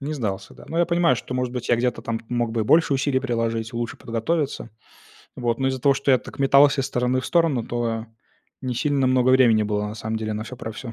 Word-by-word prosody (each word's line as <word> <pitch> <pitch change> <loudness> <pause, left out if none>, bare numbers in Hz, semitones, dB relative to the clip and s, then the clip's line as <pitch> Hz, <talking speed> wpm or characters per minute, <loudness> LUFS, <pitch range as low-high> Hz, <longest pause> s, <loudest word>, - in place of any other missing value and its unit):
Не 150 +3 -4
сдался, 100 -7 -4
да. - - -14
Но 165 - -2
я 175 - +3
понимаю, 170 -6 +3
что, 125 - -6
может 125 -1 -2
быть, 125 -2 -5
я 120 - +4
где-то 125 +1 -1
там 115 -1 -3
мог 120 -1 -1
бы 115 - -1
и 110 - 0
больше 160 +2 +4
усилий 135 -1 +1
приложить, 115 -2 -2
лучше 120 0 -3
подготовиться. 130 +2 -2 0.7
Вот, 120 -2 -1
но 135 0 +1
из-за 130 -1 -3
того, 140 +2 +4
что 135 +1 0
я 130 - +5
так - - -12
метался 140 +1 +5
из 135 - -1
стороны 125 +1 0
в - - -6
сторону, 165 -8 +2
то 115 -1 -2 0.6
не 125 -1 -2
сильно 140 +1 +1
много 130 0 +3
времени 120 -4 +5
было 105 0 -1
на 105 - -6
самом 110 0 -4
деле 110 -1 -3
на 105 +1 -4
всё 125 +3 -9
про 110 -2 -6
всё. 115 +2 -8
125 Hz, 245 wpm, -23 LUFS, 115-135 Hz, 0.7 s, я